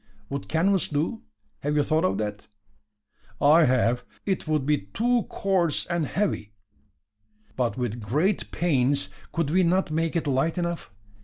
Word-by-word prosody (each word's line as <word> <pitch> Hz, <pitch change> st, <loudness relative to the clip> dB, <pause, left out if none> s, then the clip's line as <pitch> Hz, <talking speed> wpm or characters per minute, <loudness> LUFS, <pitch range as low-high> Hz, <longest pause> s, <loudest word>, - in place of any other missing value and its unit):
"Would 140 Hz, 0 st, -4 dB
canvas 185 Hz, +4 st, +2 dB
do? 155 Hz, +10 st, -2 dB, 0.4 s
Have 145 Hz, +1 st, -1 dB
you 145 Hz, -, +3 dB
thought 155 Hz, +4 st, +1 dB
of -, -, +1 dB
that?" 105 Hz, -1 st, -4 dB, 0.9 s
"I 155 Hz, +3 st, +6 dB
have. 125 Hz, -1 st, +2 dB, 0.2 s
It 190 Hz, -4 st, -1 dB
would 155 Hz, -3 st, +1 dB
be 150 Hz, 0 st, +2 dB
too 235 Hz, -, +1 dB
coarse 185 Hz, -5 st, 0 dB
and 170 Hz, -4 st, -1 dB
heavy." 145 Hz, -, -2 dB, 1.0 s
"But, 125 Hz, -1 st, -1 dB
with 120 Hz, -2 st, -3 dB
great 150 Hz, -, 0 dB
pains, 140 Hz, -, +1 dB, 0.2 s
could 165 Hz, -3 st, -1 dB
we 185 Hz, +3 st, +4 dB
not 180 Hz, -1 st, +2 dB
make 165 Hz, +2 st, 0 dB
it 165 Hz, -, 0 dB
light 145 Hz, +5 st, +1 dB
enough? 170 Hz, -1 st, -2 dB
155 Hz, 150 wpm, -26 LUFS, 130-175 Hz, 1.0 s, I